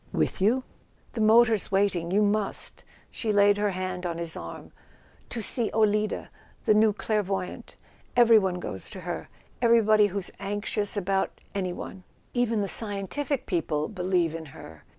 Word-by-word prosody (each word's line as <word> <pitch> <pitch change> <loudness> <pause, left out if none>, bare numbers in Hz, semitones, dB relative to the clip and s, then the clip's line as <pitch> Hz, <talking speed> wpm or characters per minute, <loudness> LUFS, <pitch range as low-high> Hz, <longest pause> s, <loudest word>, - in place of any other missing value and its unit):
"With - - 0
you 240 +7 +3 0.2
?" - - -34
"The 225 - -2
motor's 220 -1 +4
waiting—you 195 0 +2
must." 205 0 -1 0.3
She 220 - -2
laid 205 0 +5
her 205 0 +2
hand 185 -1 -4
on 170 -2 -3
his 170 -1 -2
arm. - - -8 0.6
"To 230 - -4
see 235 +2 0
Olida, 215 -1 +1 0.4
the - - +5
new 215 0 +5
clairvoyante. 200 -3 -3 0.4
Every¬ 230 -2 +7
body 185 -2 -1
goes 95 - -6
to 185 - -8
her—everybody 215 +4 +2
who's 200 -1 -4
anxious 205 +1 -2
about 195 0 -1
any¬ 185 -3 -2
one. 190 -1 -8 0.3
Even 235 -3 +1
the 200 - -1
scientific 225 +8 -2
people 155 -5 -1
believe 180 -5 0
in 165 -1 -6
her. 80 -1 -12
205 Hz, 150 wpm, -27 LUFS, 185-215 Hz, 0.6 s, Every¬